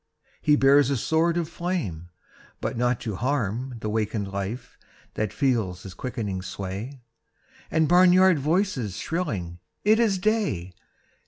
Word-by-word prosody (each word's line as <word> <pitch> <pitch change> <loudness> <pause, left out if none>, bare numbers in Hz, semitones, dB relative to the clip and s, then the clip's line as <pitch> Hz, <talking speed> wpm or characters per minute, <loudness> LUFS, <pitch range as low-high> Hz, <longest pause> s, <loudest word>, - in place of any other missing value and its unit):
He 150 - +4
bears 140 -1 +5
a 140 - +1
sword 165 +7 +1
of 170 -2 -1
flame 160 - -4 0.5
but - - -3
not 125 0 +1
to 105 -5 -4
harm 125 -1 -1
The 110 - -2
wakened 105 -2 -1
life 100 +5 -5 0.4
that 110 -1 -2
feels 110 -10 0
his 95 - -8
quickening 105 -3 -4
sway 100 +8 -6 0.7
And 160 -1 +2
barnyard 180 0 +6
voices 145 - 0
shrilling 105 - -3 0.2
"It 215 +2 +4
is 215 -5 +3
day!" 180 - 0
125 Hz, 135 wpm, -25 LUFS, 100-165 Hz, 0.7 s, barnyard